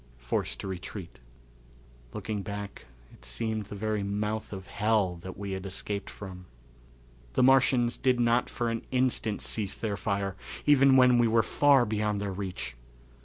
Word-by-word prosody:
Forced - - -2
to - - -5
Retreat. 95 0 -7 0.9
Looking 105 -2 -4
back 100 -6 -7 0.3
it - - -18
seemed 110 -2 -2
the 105 - -8
very 110 0 -1
mouth 105 +2 -2
of 95 -2 -7
hell 105 -3 +1
that 95 +2 -9
we 100 0 -5
had 95 0 -4
escaped 100 +1 -4
from. 90 -3 -9 0.9
The - - +3
Martians 125 -2 +4
did 130 -2 +2
not 120 +1 +3
for 120 -1 -1
an 115 - -2
instant 125 -4 0
cease 100 -3 -2
their 105 -3 -2
fire, 100 -2 -1 0.3
even 135 -2 +6
when 125 -1 +6
we 120 - +4
were 115 0 +4
far 140 -2 +4
beyond 105 -1 -1
their 100 -1 -3
reach. 90 -10 -5
105 Hz, 160 wpm, -29 LUFS, 100-120 Hz, 0.9 s, even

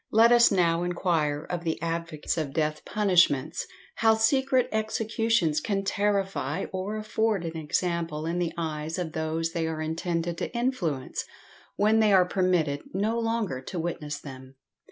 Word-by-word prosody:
Let 225 +2 +5
us 240 -1 +6
now 170 -3 +2
enquire 165 -4 0
of 175 0 -4
the 160 -2 -2
advocates 165 -2 -3
of 150 -4 -3
death 155 0 -1
punishments 180 -10 +2 0.3
how 225 0 +4
secret 260 +3 +2
executions 220 -5 +1
can 195 -2 -1
terrify 195 -6 0
or 190 +3 -3
afford 215 -3 0
an 165 0 -5
example 165 0 -2
in 170 +2 -1
the 175 -2 0
eyes 160 0 -3
of 175 -3 -3
those 160 +1 -2
they 165 -1 -1
are 160 -1 -3
intended 165 +1 -2
to - - -3
influence, 180 - -1 0.5
when 215 +2 +3
they 215 -1 +4
are 185 -2 +6
permitted 180 -6 +1
no 220 +4 0
longer 225 - -1
to 175 +7 -7
witness 160 -3 -3
them? 130 -2 -11
175 Hz, 155 wpm, -27 LUFS, 160-210 Hz, 0.5 s, us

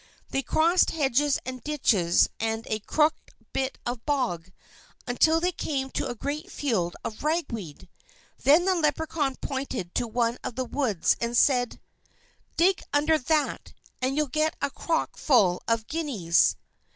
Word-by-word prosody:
They 270 - 0
crossed 335 +6 +3
hedges 290 -1 +1
and 255 -2 -6
ditches 215 - +3
and 225 0 -2
a 215 - -2
crooked 305 +8 0 0.2
bit 265 0 -1
of 240 -1 -4
bog, 230 - -1 0.5
until 315 +7 +3
they 355 +2 +1
came 270 -5 -3
to - - -2
a 245 - -4
great 300 - -5
field 200 -12 -1
of 215 - -6
ragweed. 230 - -3 0.5
Then 310 +6 +5
the 380 - +3
Leprechaun 305 -3 0
pointed 265 -10 -4
to 240 - 0
one 235 +1 0
of 235 - -5
the 255 0 -2
weeds, 240 - +1
and 235 0 0
said: 250 -3 +3 0.8
"Dig 365 +1 +3
under 305 +2 +3
that, 305 +2 -1 0.3
and 260 +2 0
you'll 305 - +3
get 310 +3 0
a 280 - -1
crock 325 +3 -2
full 200 - +3
of 230 -1 +1
guineas." 230 - +1
270 Hz, 150 wpm, -26 LUFS, 230-305 Hz, 0.8 s, Then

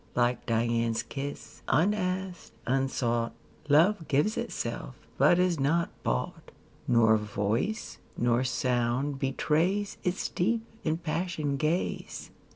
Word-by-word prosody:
Like 120 0 +1
Dian's 115 0 +1
kiss, 140 0 -7
unasked, 185 +2 0
unsought, 120 -3 0 0.4
Love 165 +4 +4
gives 150 +10 +2
itself, - - -4 0.2
but 175 - +6
is 180 -3 +2
not 165 +5 +1
bought; 60 +1 -2
15 - - -16 0.3
Nor 110 -2 +5
voice, 105 - -2 0.2
nor 120 +1 +2
sound 125 +2 0
betrays 170 +9 0
Its 180 +1 -1
deep, 225 +5 0 0.2
impassioned 160 -3 -1
ga/e. 160 +5 0
145 Hz, 105 wpm, -29 LUFS, 120-175 Hz, 0.4 s, but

